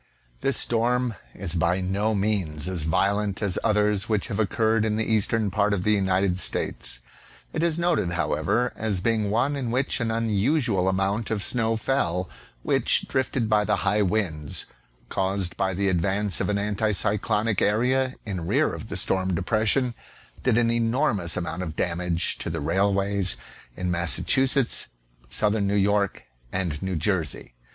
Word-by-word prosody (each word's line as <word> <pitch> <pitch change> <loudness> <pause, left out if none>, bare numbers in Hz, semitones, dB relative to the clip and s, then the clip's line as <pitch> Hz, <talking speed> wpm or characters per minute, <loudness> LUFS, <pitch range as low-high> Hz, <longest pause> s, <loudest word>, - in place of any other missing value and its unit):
This 135 -3 +2
storm 120 +1 +2 0.2
is 90 -3 -3
by 85 +2 +1
no 100 +4 0
means 95 -7 0
as 90 -4 -1
violent 100 +5 +1
as 100 -2 +1
others 105 -1 +1
which 105 +1 0
have 105 -1 -3
occurred, 110 +1 +2
in 110 -1 0
the 110 0 0
eastern 110 -1 +1
part 100 +1 +2
of 90 - -3
the 105 - +3
United 95 -2 +1
States. - - -2 0.5
It 160 - -1
is 170 -1 +1
noted^ 170 - +1
however, 80 +9 0
as 105 -4 -1
being 110 0 +1
one 125 +7 +1
in 130 -4 -3
which 130 +4 0
an 115 -2 -1
unusual 110 - +1
amount 100 +3 0
of 105 -3 -1
snow 115 -2 +1
fell, 95 -7 0 0.4
which, - - +2
drifted 130 -3 0
by 105 -1 +3
the - - +1
high 105 +2 +3
winds 90 -7 -1 0.4
caused 95 -2 -1
by 95 -1 -1
the 100 +2 +1
advance 95 +2 0
of - - -1
an 105 - +1
anticyclonic 105 +1 0
area 125 +5 +2
in 90 -6 -4
rear - - +2
of - - -7
the - - -3
storm 95 -1 +1
depression, 110 +7 +1 0.5
did 125 -3 +2
an 115 -1 +3
enormous 115 - 0
amount 90 0 -3
of 80 -4 -5
damage 85 0 -1
to - - -4
the - - -3
railways 95 +4 +1 0.4
in 90 -1 -1
Massachusetts, 105 - +2 0.4
southern 105 - +1
New 100 - +1
York, 100 0 +1 0.3
and 85 -6 -2
New 95 -1 -2
Jersey. 85 -5 -1
100 Hz, 160 wpm, -25 LUFS, 90-115 Hz, 0.5 s, the